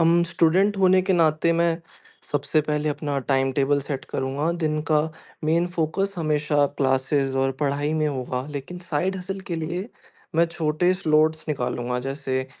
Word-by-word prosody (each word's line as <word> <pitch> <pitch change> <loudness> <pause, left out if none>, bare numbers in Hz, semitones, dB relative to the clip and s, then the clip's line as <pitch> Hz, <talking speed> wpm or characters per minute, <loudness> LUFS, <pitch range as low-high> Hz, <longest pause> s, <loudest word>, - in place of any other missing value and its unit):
अम, 165 +1 +5
student 180 +5 +2
होने 185 -1 +5
के 190 +1 +1
नाते 165 -1 +3
मैं 170 0 +1 0.5
सबसे 145 +2 +1
पहले 150 0 -1
अपना 145 -1 -2
टाइमटेबल 135 +1 +2
सेट 140 -1 -4
करूँगा। 140 +5 -1
दिन 155 -3 -1
का 150 -1 +5 0.4
मेन 165 +3 +2
फ़ोकस 190 +5 0
हमेशा 150 -2 +2
क्लासेस 135 0 +1
और 135 0 +2
पढ़ाई 145 +1 0
में 155 -1 +1
होगा। 130 -3 -2
लेकिन 145 +5 -6
साइड 175 +2 -1
हसल 190 +1 -5
के 170 - -1
लिए 170 +6 -3 0.5
मैं 165 +1 +4
छोटे 165 +1 +1
स्लॉट्स 155 -2 +2
निकालूँगा। 125 -3 -2
जैसे 135 0 -2
155 Hz, 150 wpm, -24 LUFS, 140-170 Hz, 0.5 s, अम